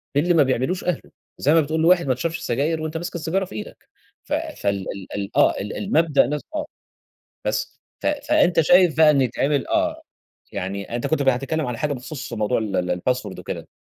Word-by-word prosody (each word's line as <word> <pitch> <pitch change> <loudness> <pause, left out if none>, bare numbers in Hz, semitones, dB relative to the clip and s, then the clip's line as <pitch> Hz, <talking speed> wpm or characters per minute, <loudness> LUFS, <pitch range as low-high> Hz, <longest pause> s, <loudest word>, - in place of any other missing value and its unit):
باللي 175 +5 +3
ما 155 -3 +6
بيعملوش 130 +7 0
أهله. 180 -4 -3 0.3
زي 150 +3 +3
ما 165 - +6
بتقول 160 +2 -1
لواحد 175 -2 +4
ما 130 - +3
تشربش 165 +6 -3
سجاير 150 +6 -1
وأنت 155 +1 -3
ماسك 175 +1 -5
السيجارة 170 +4 -1
في 110 - -11
إيدك. 105 - -9 0.3
ف - - -5
فال 100 -1 -2
ال 100 -1 -8
ال 100 -1 -5
آه، - - +5
ال 105 - -5
المبدأ 160 -9 +3
نفس 150 +1 -3
آه. 300 -1 -1 0.8
بس - - -2 0.2
ف - - -4
فأنت 295 - +3
شايف 175 0 +5
بقى 155 -1 +7
إن 140 -2 +3
يتعمل 135 +3 0
آه، 320 -1 0 0.5
يعني 100 +5 -4
أنت 120 - -2
كنت 160 -3 +1
ب 135 - +1
هتتكلم 135 +4 0
على 125 -2 -4
حاجة 150 -1 0
بخصوص 130 0 -7
موضوع 110 +2 0
ال 110 -3 -2
ال 90 0 0
الباسورد 125 +9 -1
وكده، - - -6
150 Hz, 200 wpm, -22 LUFS, 125-170 Hz, 0.8 s, بقى